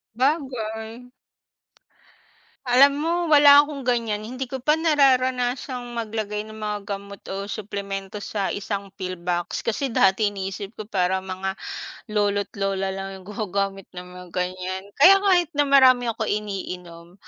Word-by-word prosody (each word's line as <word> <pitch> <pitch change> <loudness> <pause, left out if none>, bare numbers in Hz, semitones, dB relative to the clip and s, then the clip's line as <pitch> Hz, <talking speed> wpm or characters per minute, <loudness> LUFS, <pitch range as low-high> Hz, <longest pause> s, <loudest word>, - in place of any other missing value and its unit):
'Bagay 245 -4 -2 1.6
Alam 275 +3 +7
mo 330 +2 0
wala 290 -2 +8
akong 285 -2 -7
ganyan, 230 -4 0
hindi 255 +5 -5
ko 260 0 -6
pa 300 +4 +3
nararanasang 260 -4 +2 0.2
maglagay 215 -2 -3
ng 215 0 -11
mga 210 -1 -2 0.2
gamot 200 0 -8 0.2
o 200 +1 -5
suplemento 200 -1 -5
sa 200 -1 -2
isang 200 -1 -4
pill 185 -2 -5
box. 175 0 -3
Kasi 250 +4 -1
dati 205 -1 +3
iniisip 195 +1 -6
ko 215 - -6
parang 190 -3 0
mga, 190 0 -4 0.5
lolo't 205 -1 0
lola 195 -1 -1
lang 195 0 -5
yung 190 +1 -12
gumagamit 195 -2 -2
ng 180 0 -9
mga 180 - -10
ganyan. 185 +1 -3
Kaya 390 +7 +8
kahit 355 -4 +3
na 290 -1 +1
marami 255 -3 +6
akong 225 -1 -2
iniinom, 180 -5 -5
210 Hz, 140 wpm, -24 LUFS, 195-255 Hz, 1.6 s, wala